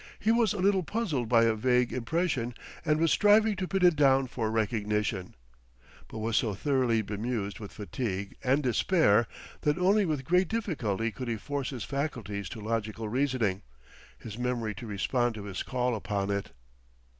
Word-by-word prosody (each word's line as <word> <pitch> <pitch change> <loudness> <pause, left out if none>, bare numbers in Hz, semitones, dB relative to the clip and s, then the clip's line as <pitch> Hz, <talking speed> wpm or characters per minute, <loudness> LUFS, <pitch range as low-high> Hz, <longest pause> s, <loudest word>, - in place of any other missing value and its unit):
He 220 - +1
was 230 -3 +3
a - - -3
little 195 0 +3
puzzled 165 - -2
by 115 -1 +5
a 115 -1 +3
vague 125 +2 +2
impression, 130 -2 -1 0.3
and 155 -1 +2
was 165 -1 +3
striving 210 +1 +5
to 185 -1 -2
pin 195 -1 +2
it 175 -2 +6
down 135 -2 +4
for 120 -3 -3
recognition; 105 -3 -1 0.7
but - - -9
was 110 0 0
so 105 -4 +1
thoroughly 125 -3 +1
bemused 105 -1 -3
with 105 -2 -8
fatigue 100 -3 -4
and 135 +3 +2
despair 120 - +3 0.3
that 150 +2 +1
only 195 +2 +3
with 145 -4 -2
great 180 +3 +3
difficulty 125 - -1
could 125 +2 -6
he 115 -1 -1
force 140 +4 -3
his 125 -6 -5
faculties 115 -9 -3
to 115 - -7
logical 110 0 -3
reasoning, 120 -6 0 0.6
his 110 - -9
memory 120 -3 -1
to 115 - -9
respond 120 +4 0
to 105 - -7
his 100 -2 -5
call 125 -1 -1
upon 100 -2 -2
it. 100 0 -2
125 Hz, 170 wpm, -29 LUFS, 110-150 Hz, 0.7 s, it